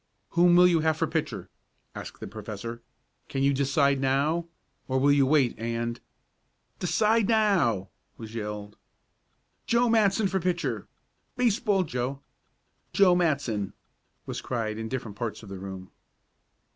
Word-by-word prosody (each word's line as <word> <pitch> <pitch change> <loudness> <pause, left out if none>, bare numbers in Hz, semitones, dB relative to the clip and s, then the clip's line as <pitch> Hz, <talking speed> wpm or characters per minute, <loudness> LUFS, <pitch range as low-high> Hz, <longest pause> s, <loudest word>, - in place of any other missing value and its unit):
"Whom 175 0 +5
will 180 0 +7
you 175 -2 +4
have 160 0 +1
for - - +1
pitcher?" - - -3 0.5
asked - - -8
the - - -4
Professor. 110 +3 -7 0.5
"Can 135 -1 -1
you 140 0 +4
decide 140 0 +2
now, 140 +6 +1 0.4
or 130 - 0
will 140 +2 +4
you 140 -2 +4
wait 140 -4 +3
and 115 0 -2 0.4
" - - -45
"Decide 215 +4 +2
now!" 185 - +2 0.3
was 110 -1 -9
yelled. 105 -2 -5 0.9
"Joe 235 +1 +3
Matson 215 -2 +3
for 190 0 0
pitcher! 175 -1 -2 0.5
Baseball 220 -5 +2
Joe. 130 -2 -3 0.7
Joe 195 -3 +6
Matson!" 140 - 0 0.5
was - - -5
cried 110 -3 -3
in 110 0 -4
different 115 -5 -5
parts 115 -2 -4
of 105 - -11
the 95 -1 -7
room. 95 -1 -8
140 Hz, 140 wpm, -27 LUFS, 115-180 Hz, 0.9 s, will